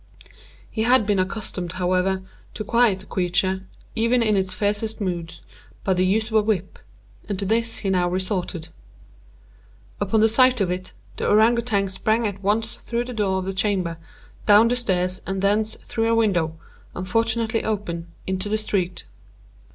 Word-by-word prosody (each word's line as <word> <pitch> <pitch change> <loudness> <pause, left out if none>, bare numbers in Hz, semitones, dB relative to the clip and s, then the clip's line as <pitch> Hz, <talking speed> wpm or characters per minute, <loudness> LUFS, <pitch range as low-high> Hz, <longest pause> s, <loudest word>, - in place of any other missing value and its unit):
He 220 - -4
had 245 0 +4
been 205 -2 +1
accustomed, 185 -2 -2
however, 185 +1 0 0.3
to 215 - -3
quiet 220 -3 +3
the - - -14
creature, 185 +1 0 0.3
even 230 +1 +2
in 215 -2 +2
its 190 -1 0
fiercest 210 +3 -1
moods, 175 -4 -4 0.4
by 190 - +2
the 185 0 +2
use 215 +4 +1
of - - -10
a - - +5
whip, 205 -3 -2 0.5
and 200 - -1
to 200 - -2
this 225 +2 0
he 195 - -2
now 180 -1 +2
resorted. 180 -2 -2 1.3
Upon 215 +2 +3
sight 255 +2 +4
of 190 -3 +1
it, 185 +1 -4 0.2
the - - -2
Ourang 220 +3 +5
Outang 220 -4 0
sprang 220 +4 0
at 200 -2 -3
once 220 +4 0
through 240 +1 -3
the 250 - -6
door 200 -4 0
of 190 - -3
the 195 - -3
chamber, 190 -4 0 0.5
down 210 +2 +7
the 245 - +2
stairs, 185 -6 -1
and 195 0 -2
thence, 215 +2 +2
through 225 0 -2
a 230 - +3
window, 175 -8 +1 0.4
unfortunately 225 +4 0
open, 175 -6 -3 0.2
into 190 +2 -2
the 215 - +1
street. 185 -4 -2
200 Hz, 165 wpm, -23 LUFS, 185-220 Hz, 1.3 s, down